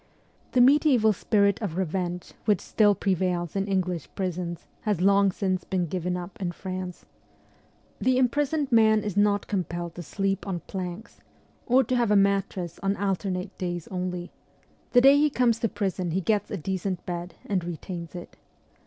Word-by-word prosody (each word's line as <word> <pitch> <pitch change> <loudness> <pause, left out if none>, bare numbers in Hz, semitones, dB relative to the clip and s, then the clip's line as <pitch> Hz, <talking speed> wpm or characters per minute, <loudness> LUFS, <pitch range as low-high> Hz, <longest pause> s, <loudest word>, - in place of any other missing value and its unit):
The 250 - +5
mediaeval 255 -5 +5
spirit 200 +1 +2
of 185 -6 -3
revenge 180 -1 -2
which 210 -5 +3
still 205 -2 +3
prevails 180 -3 -1
in 195 0 0
English 180 -5 -1
prisons 180 -2 -3 0.2
has 210 -5 0
long 200 +1 +4
since 185 -1 -1
been 185 -2 -1
given 180 +1 -2
up 180 +2 -8
in 175 -2 -2
France. 185 -1 -6 0.9
The 255 0 +2
imprisoned 285 +3 +1
man 220 -2 +5
is 205 -3 -3
not 205 0 +2
compelled 175 -3 -3
to 175 - -7
sleep 195 +4 -2
on 180 -3 -3
planks, 185 +2 -7 0.5
or 255 +2 +5
to 255 +2 -1
have 240 -3 +2
a 210 - +4
mattress 195 -3 +1
on 195 0 +1
alternate 190 -2 -2
days 175 -2 -3
only; 180 -1 -4 0.6
the 245 - +5
day 275 +2 +7
he 300 +1 +4
comes 240 -4 +2
to 230 - 0
prison 190 -4 -2
he 185 +4 0
gets 205 +2 0
a 205 - -3
decent 190 +1 -3
bed 175 0 -5
and 190 -4 -1
retains 170 +1 -6
it. 175 - -9
190 Hz, 165 wpm, -26 LUFS, 180-210 Hz, 0.9 s, day